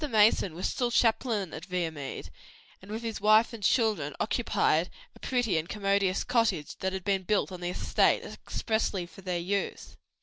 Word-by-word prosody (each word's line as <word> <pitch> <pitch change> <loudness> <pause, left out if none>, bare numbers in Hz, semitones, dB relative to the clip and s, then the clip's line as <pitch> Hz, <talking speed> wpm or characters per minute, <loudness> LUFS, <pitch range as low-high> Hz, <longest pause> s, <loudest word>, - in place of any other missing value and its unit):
Mason 210 -6 +4
was 180 - -1
still 245 -1 -1
chaplain 225 -5 +1
at 160 - -7
Viamede, 165 -7 -4 0.5
and 190 - -14
with 220 +2 -5
his 225 -3 -4
wife 215 +3 +5
and 230 - -8
children 220 +1 +1
occupied - - +1 0.3
a - - -16
pretty 245 -9 0
and 160 +2 -6
commodious 195 -2 +1
cottage 215 -11 0
which 190 0 -1
had 190 - -5
been 195 0 +1
built 200 +1 0
on 180 -1 -7
the 175 - -2
estate 180 - +2
expressly 220 -5 -2
for 180 - -14
their 180 -2 -2
use. 195 +4 -3
200 Hz, 170 wpm, -29 LUFS, 180-220 Hz, 0.5 s, wife